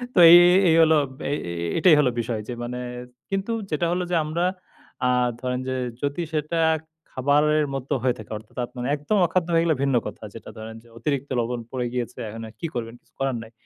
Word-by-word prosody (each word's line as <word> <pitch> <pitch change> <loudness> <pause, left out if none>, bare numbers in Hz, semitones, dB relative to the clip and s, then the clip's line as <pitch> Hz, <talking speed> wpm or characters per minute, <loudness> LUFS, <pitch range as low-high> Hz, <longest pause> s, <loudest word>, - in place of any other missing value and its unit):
তো - - +5
এই 170 - +11
এই 180 +1 +6
এই 160 - +5
হলো 160 0 +5 0.3
এ - - -1 0.2
এ - - -3 0.3
এটাই 165 -1 +6
হল 140 - +4
বিষয় 115 -1 -2
যে 125 - -4
মানে, 125 +1 -4 0.5
কিন্তু 195 +3 -2 0.2
যেটা 155 +3 0
হলো 180 +1 0
যে - - +2
আমরা 155 +3 -2 0.6
আ - - +3 0.3
ধরেন 125 -1 -2
যে 130 - -1 0.3
যদি 145 +4 -1
সেটা 155 +2 -1 0.5
খাবারের 150 +3 +2
মতো 135 0 -3
হয়ে 125 -1 +2
থাকে? 110 - -11
অর্থাৎ 105 0 -16
আপনার 125 0 -8
একদম 150 +9 -1
অখাদ্য 170 0 0
হয়ে 165 - +4
গেলে 165 -2 +2
ভিন্ন 135 -2 +2
কথা। - - -9
যেটা 115 - -10
ধরেন 110 +1 -8
যে - - -20
অতিরিক্ত 140 +3 -2
লবণ 120 +1 -2
পড়ে 125 -2 -2
গিয়েছে, 125 -2 -4
এখন 115 +2 -8
এ - - -14
কী 165 - -3
করবেন? 115 -1 -4
কিছু - - -36
করার 135 -2 0
নাই। 110 - -14
140 Hz, 210 wpm, -24 LUFS, 120-160 Hz, 0.6 s, এই